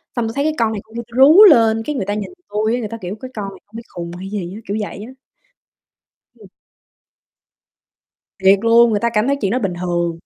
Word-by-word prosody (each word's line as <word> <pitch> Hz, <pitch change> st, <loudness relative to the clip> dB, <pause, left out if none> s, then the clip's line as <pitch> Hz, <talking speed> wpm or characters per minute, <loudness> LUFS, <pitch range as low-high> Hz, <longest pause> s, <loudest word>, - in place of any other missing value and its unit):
xong 235 Hz, -2 st, -1 dB
tui 225 Hz, -, -5 dB
thấy 280 Hz, -, 0 dB
cái 310 Hz, -, 0 dB
con 225 Hz, -1 st, +1 dB
này, 205 Hz, -2 st, -5 dB
con 220 Hz, +1 st, -20 dB
kia, 235 Hz, -, -3 dB
tui 235 Hz, +1 st, -11 dB
rú 310 Hz, +10 st, +8 dB
lên, 225 Hz, -, +5 dB
cái 300 Hz, -, -3 dB
người 215 Hz, -, -3 dB
ta 205 Hz, -, -2 dB
nhìn 210 Hz, -1 st, -4 dB, 0.2 s
tui 215 Hz, +2 st, -1 dB
á, 250 Hz, -, -3 dB
người 215 Hz, -3 st, -5 dB
ta 230 Hz, -, -7 dB
kiểu: 185 Hz, +3 st, -5 dB
"Cái 255 Hz, 0 st, -8 dB
con 205 Hz, -4 st, -5 dB
này 190 Hz, -, -14 dB, 0.2 s
bị 230 Hz, -, -7 dB
khùng 170 Hz, -1 st, -8 dB
hay 190 Hz, +1 st, -8 dB
gì 190 Hz, -3 st, -5 dB
á." 220 Hz, -, -10 dB
Kiểu 205 Hz, +2 st, -2 dB
vậy 205 Hz, 0 st, -7 dB
á. -, -, -11 dB, 1.2 s
Ừm. -, -, -17 dB, 1.9 s
Thiệt 195 Hz, +1 st, +5 dB
luôn, 230 Hz, +1 st, +5 dB
người 205 Hz, -, 0 dB
ta 235 Hz, -, 0 dB
cảm 215 Hz, +4 st, +1 dB
thấy 280 Hz, -, +1 dB
chuyện 195 Hz, 0 st, 0 dB
đó 255 Hz, -, 0 dB
bình 195 Hz, -5 st, -2 dB
thường. 175 Hz, -2 st, -2 dB
220 Hz, 245 wpm, -18 LUFS, 195-235 Hz, 1.9 s, rú